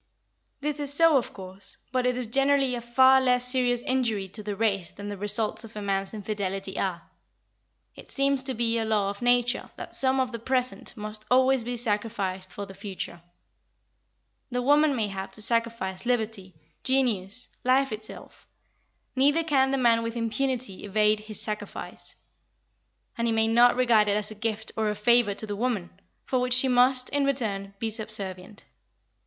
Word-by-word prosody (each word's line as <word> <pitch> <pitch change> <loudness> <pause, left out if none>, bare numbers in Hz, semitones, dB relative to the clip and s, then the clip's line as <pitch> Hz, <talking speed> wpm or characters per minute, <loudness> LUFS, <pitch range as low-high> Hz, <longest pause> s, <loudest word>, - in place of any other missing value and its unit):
This 300 0 -2
is 285 -1 -1
so, 330 +1 +5
of 250 - -2
course, 190 0 -8
but 255 0 +1
it 250 0 0
is 250 - -2
generally 275 +2 +2
a 240 - -3
far 260 +3 +5
less 250 -1 +2
serious 245 -1 +2
injury 230 -7 0
to 210 +3 -6
the 205 -1 -4
race 195 -5 0
than 205 0 -8
the 205 - -4
results 210 +3 0
of 225 -1 -12
a 210 - -5
man's 195 -1 -1
infidelity 195 -2 -4
are. 175 -3 -2 0.9
It - - -13
seems 275 -1 +2
to 265 -1 +2
be 230 0 +1
a - - 0
law 210 -3 0
of 200 - -11
nature 245 0 +2
that - - -9
some 265 0 +2
of 255 -1 0
the 230 - -5
present 255 +1 -2
must 215 0 -6
always 260 0 +4
be 245 +1 -3
sacrificed 205 -5 -2
for 200 - -6
the 195 - -11
future. 190 -3 -6 1.3
The 250 -1 -2
woman 290 +2 +4
may 220 -4 0
have 195 0 -6
to 215 - -3
sacrifice 230 -5 -1
liberty, 220 -7 -2 0.3
genius, 250 -4 +1
life 265 +1 +2
itself. 215 0 -8 0.7
Neither 290 +5 +3
can 270 -4 +2
the 275 - 0
man 235 -3 +3
with 230 0 -4
impunity 235 -2 -2
evade 210 +1 +2
his 215 0 -6
sacrifice. 210 -1 -3 1.0
And 235 - +1
he - - +1
may 225 0 +3
not 240 +2 +5
regard 235 -4 +3
it 205 0 +2
as 210 0 -3
a - - -5
gift 220 0 -3
or 220 -1 0
a 210 - -2
favour 215 -1 +3
to 220 - -4
the 205 -1 -4
woman, 210 -5 -2 0.3
for 255 - 0
which 250 0 +2
she 255 +1 +7
must, 255 0 +4
in 285 0 0
return, 205 -8 -2
be 225 +2 -2
subservient. 205 -3 -6
230 Hz, 180 wpm, -26 LUFS, 205-255 Hz, 1.3 s, she